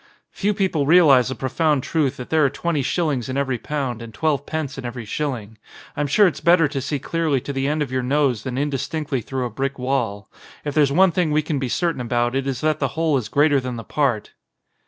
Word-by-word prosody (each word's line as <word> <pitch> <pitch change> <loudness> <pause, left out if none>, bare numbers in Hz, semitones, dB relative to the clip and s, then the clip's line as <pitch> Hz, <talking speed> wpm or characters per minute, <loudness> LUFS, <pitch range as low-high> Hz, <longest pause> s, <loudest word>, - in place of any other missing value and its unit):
"Few 205 +1 -1
people 180 -8 0
realise 150 -7 +6
the 130 - -3
profound 135 +3 0
truth 150 -5 0
that 125 - -8
there 160 -1 +4
are 140 - +4
twenty 155 +2 -1
shillings 140 -4 -1
in 130 - -2
every 135 -3 -1
pound 130 -5 -3
and 115 -1 -8
twelve 145 +2 -1
pence 155 -4 -3
in - - -7
every 120 -1 -6
shilling. 110 -4 -4 0.4
I'm 145 0 -1
sure 205 +9 +5
it's 180 - 0
better 170 -2 +5
to 135 -1 -3
see 145 +2 -2
clearly 155 -1 0
to 140 - -5
the 135 0 -1
end 150 +1 0
of 135 - -7
your 130 0 0
nose 130 -3 +1
than 130 0 -5
indis 140 -1 -2
tinctly 150 -6 -2
through 130 -2 -3
a 120 - -4
brick 135 +4 -3
wall. 125 -6 -2 0.4
If 145 - -2
there's 145 -2 +3
one 185 +5 +5
thing 175 -1 +1
we 150 +1 +2
can 150 -2 -2
be 130 -2 -2
certain 170 -1 0
about 120 0 0
it 135 0 -1
is 130 -3 -2
that 155 -1 +1
the 135 +1 -2
whole 160 -2 +2
is 120 -5 -2
greater 145 -1 +3
than 125 -1 -5
the 115 - -6
part." 130 -7 -1
140 Hz, 240 wpm, -22 LUFS, 125-155 Hz, 0.4 s, realise